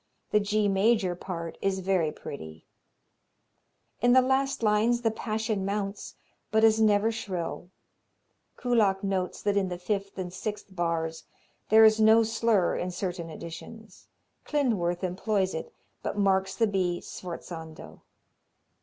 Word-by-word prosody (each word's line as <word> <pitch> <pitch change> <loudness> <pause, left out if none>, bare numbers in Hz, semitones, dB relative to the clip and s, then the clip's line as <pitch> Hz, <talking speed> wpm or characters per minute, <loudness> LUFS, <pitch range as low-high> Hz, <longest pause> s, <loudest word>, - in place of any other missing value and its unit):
The 210 - +4
G 210 0 +1
major 195 -1 +2
part 170 -2 -6
is 195 -1 0
very 180 -4 +1
pretty. 80 - -9 1.4
In 245 +1 +5
the 260 - +7
last 265 -1 0
lines 220 +3 +3
the 225 -2 +1
passion 220 -2 -2
mounts, 200 0 -3 0.3
but 220 +1 +2
is 220 0 +5
never 215 +1 +4
shrill. 180 -5 -5 0.9
Kullak 215 -6 +2
notes 190 -2 -2
that 205 -1 +1
in 195 -2 +1
the 180 - -4
fifth 200 +2 -3
and 180 -2 -5
sixth 205 0 -6
bars 165 -2 -2 0.4
there 220 +1 +8
is 220 0 +5
no 220 +1 +6
slur 225 -4 +1
in 180 - -2
certain 180 -2 -4
editions. 185 +7 -10 0.4
Klindworth 200 - 0
employs 190 +1 0
it, 160 - -5 0.3
but - - -4
marks 190 -1 +2
the 230 - +3
B 185 -4 0
sforzando. 165 -2 -9
195 Hz, 135 wpm, -28 LUFS, 180-220 Hz, 1.4 s, there